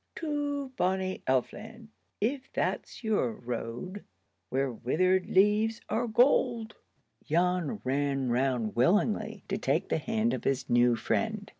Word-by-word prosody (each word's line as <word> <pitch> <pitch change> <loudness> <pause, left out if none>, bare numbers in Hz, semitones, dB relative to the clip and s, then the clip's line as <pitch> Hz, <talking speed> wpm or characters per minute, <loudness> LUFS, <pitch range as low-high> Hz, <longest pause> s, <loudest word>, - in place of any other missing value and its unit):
To 290 -3 -2
bonnie 185 +1 0
Elf 130 -1 +1
land, 225 +1 -11 0.3
if 260 +5 -2
that's - - -2
your 205 - +1
road, 120 - -5 0.5
where 135 +1 0
withered 185 +11 +1
leaves 210 +4 +3
are 230 +3 0
gold." 235 -1 +2 0.5
Jan 180 +4 0
ran 135 0 0
round 125 -3 0
willingly 210 - +1
to 195 +1 -2
take 155 +2 0
the - - +1
hand 225 +6 0
of - - -3
his 135 0 0
new 120 0 +4
friend. 215 - -1
190 Hz, 130 wpm, -29 LUFS, 135-220 Hz, 0.5 s, new